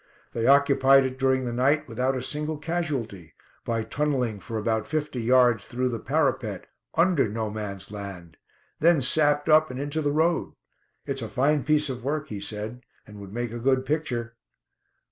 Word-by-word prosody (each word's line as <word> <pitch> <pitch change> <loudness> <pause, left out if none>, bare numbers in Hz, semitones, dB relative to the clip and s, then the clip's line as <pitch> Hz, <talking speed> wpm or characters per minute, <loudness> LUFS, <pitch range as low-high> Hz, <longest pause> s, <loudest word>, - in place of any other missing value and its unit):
They 115 0 -1
occupied 135 -1 +5
it 130 0 -4
during 130 -1 +2
the 120 - -3
night 140 +5 +2
without 130 +3 -1
a 125 - -3
single 150 +3 -2
casualty, 145 - -4 0.3
by 115 -1 -1
tunnelling 125 -3 -1
for 110 +3 -6
about 110 0 -1
fifty 150 -5 -2
yards 120 -2 +4
through 125 +1 -1
the 115 -2 -3
parapet, 130 - -1 0.3
under 170 - +3
'No 110 0 -3
Man's 105 -3 -6
Land'; 95 -5 -8 0.4
then 165 0 +4
sapped 145 +2 +2
up 155 0 +5
and 125 0 -6
into 145 +3 -2
the 145 -1 0
road. 160 +3 +1 0.5
It's 135 -1 -3
a 115 - -3
fine 140 +4 +1
piece 150 -1 +2
of 125 -3 -5
work," 145 +2 -2
he 105 - -5
said, 110 +4 -5 0.2
"and 105 -1 -12
would 100 -1 -10
make 120 +1 -3
a 120 - -5
good 130 +1 +1
picture." 125 -6 -2
130 Hz, 175 wpm, -26 LUFS, 115-145 Hz, 0.5 s, occupied